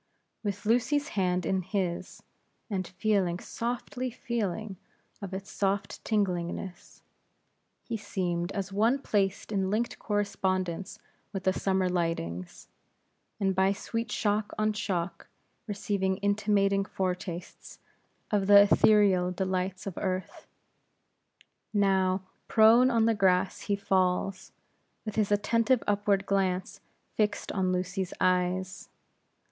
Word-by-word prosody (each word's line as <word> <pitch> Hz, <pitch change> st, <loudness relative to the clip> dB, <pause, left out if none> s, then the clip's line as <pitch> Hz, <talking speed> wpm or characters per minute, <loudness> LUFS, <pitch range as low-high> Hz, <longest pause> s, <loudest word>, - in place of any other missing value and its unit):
With 200 Hz, 0 st, -3 dB
Lucy's 280 Hz, +7 st, +2 dB
hand 180 Hz, -, 0 dB
in 190 Hz, +2 st, +1 dB
his, 185 Hz, -2 st, -3 dB, 0.5 s
and 185 Hz, -3 st, -1 dB
feeling, 185 Hz, -2 st, 0 dB
softly 245 Hz, +4 st, -4 dB
feeling 215 Hz, -4 st, -3 dB, 0.4 s
of 195 Hz, -2 st, -6 dB
its 195 Hz, +1 st, -6 dB
soft 200 Hz, 0 st, -1 dB
tinglingness; 180 Hz, -3 st, -2 dB, 0.8 s
he 230 Hz, -, -3 dB
seemed 180 Hz, -4 st, -2 dB
as 195 Hz, -1 st, -4 dB
one 225 Hz, +6 st, +3 dB
placed 200 Hz, -6 st, -1 dB
in 195 Hz, -2 st, 0 dB
linked 225 Hz, +4 st, -1 dB
correspondence 190 Hz, -3 st, -1 dB, 0.3 s
with 195 Hz, -2 st, -4 dB
the 190 Hz, -, +2 dB
summer 190 Hz, -1 st, +1 dB
lightnings; 165 Hz, -, -3 dB, 0.7 s
and 195 Hz, -2 st, +1 dB
by 190 Hz, +1 st, +3 dB
sweet 230 Hz, +3 st, -4 dB
shock 210 Hz, -1 st, 0 dB
on 215 Hz, 0 st, +1 dB
shock, 175 Hz, -4 st, -3 dB, 0.4 s
receiving 200 Hz, -2 st, -1 dB
intimating 200 Hz, -1 st, +2 dB
fore 190 Hz, -2 st, -1 dB
tastes 175 Hz, -1 st, -8 dB, 0.5 s
of 200 Hz, -2 st, +1 dB
the 200 Hz, 0 st, +9 dB
etherealest 195 Hz, -4 st, +4 dB
delights 185 Hz, +1 st, -2 dB
of 195 Hz, -3 st, -5 dB
earth. 185 Hz, -1 st, -4 dB, 1.3 s
Now, 190 Hz, -2 st, +2 dB, 0.2 s
prone 230 Hz, +3 st, +6 dB
on 230 Hz, -3 st, +3 dB
the 230 Hz, -, +4 dB
grass 190 Hz, -2 st, +2 dB
he 205 Hz, -, -1 dB
falls, 185 Hz, -1 st, 0 dB, 0.5 s
with 215 Hz, -, -4 dB
his 210 Hz, -2 st, +1 dB
attentive 230 Hz, +4 st, +2 dB
upward 205 Hz, -1 st, +1 dB
glance 190 Hz, -2 st, -1 dB, 0.3 s
fixed 210 Hz, -1 st, 0 dB
on 185 Hz, -2 st, 0 dB
Lucy's 185 Hz, +1 st, -2 dB
eyes. 185 Hz, 0 st, 0 dB
195 Hz, 115 wpm, -29 LUFS, 185-210 Hz, 1.3 s, the